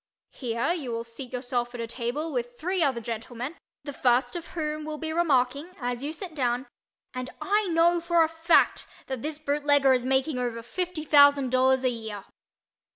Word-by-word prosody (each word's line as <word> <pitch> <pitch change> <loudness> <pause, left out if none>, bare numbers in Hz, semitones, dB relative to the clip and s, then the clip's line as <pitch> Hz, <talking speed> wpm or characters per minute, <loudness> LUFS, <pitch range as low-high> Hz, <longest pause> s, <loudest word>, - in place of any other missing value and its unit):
Here 235 +5 -1
you 285 -9 -4
will 230 0 -3
seat 235 +2 -8
yourself 245 -1 -2
at - - -6
a 230 - -2
table 250 +7 -3
with 245 -1 -3
three 365 +3 -1
other 265 -6 +1
gentlemen, 235 +5 -5 0.3
the 285 -1 -6
first 250 +5 +2
of 340 -1 -5
whom 305 -1 -2
will 305 0 -5
be 315 0 -3
remarking, 290 0 +1
as 245 0 -3
you 295 - -2
sit 335 +1 -6
down, 250 -3 0 0.5
"and 255 0 -5
I 415 +1 +1
know 340 0 +3
for 340 0 +3
a - - +2
fact 325 +1 +3 0.2
that 265 -3 -4
this 305 +1 -3
bootlegger 285 -2 +3
is 250 -1 +1
making 265 +1 +1
over 235 -2 -3
fifty 355 +5 -3
thousand 285 -3 +6
dollars 260 0 +3
a 255 - +3
year." 220 -4 -6
270 Hz, 185 wpm, -27 LUFS, 245-315 Hz, 0.5 s, thousand